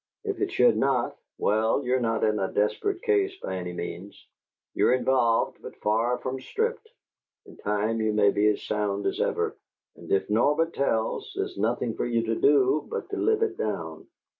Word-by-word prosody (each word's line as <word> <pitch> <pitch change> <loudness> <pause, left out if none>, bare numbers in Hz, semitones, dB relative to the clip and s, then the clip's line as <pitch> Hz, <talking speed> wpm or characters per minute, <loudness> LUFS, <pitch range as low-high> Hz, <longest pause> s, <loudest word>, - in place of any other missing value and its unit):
If - - -3
it - - 0
should - - +4
not - - +1 0.2
well, 110 +6 +1
you're 130 +1 +2
not 115 -2 0
in 105 -1 +2
a 95 - -1
desperate 360 - 0
case 400 -3 +2
by 95 - -4
any 90 -1 -4
means; 90 +3 -7 0.6
you're - - +3
involved, 125 -3 +1
but - - -9
far 115 +4 +1
from 130 +1 -4
stripped; 455 - -2 0.6
in 395 - -14
time 105 +2 -1
you 110 0 +1
may 105 -1 +4
be 105 +1 +2
as 105 - +1
sound 100 -1 -2
as - - -1
ever. - - 0 0.4
And 85 - -12
if 95 - +2
Norbert 150 +10 +2
tells, 115 -5 -1
there's - - -3
nothing 115 +3 -1
for - - -2
you 115 -1 +1
to 115 0 -1
do 140 +2 +3
but - - -5
to 405 - -2
live 440 +2 +2
it 420 -3 -2
down." 460 - -4
115 Hz, 185 wpm, -26 LUFS, 105-145 Hz, 0.6 s, should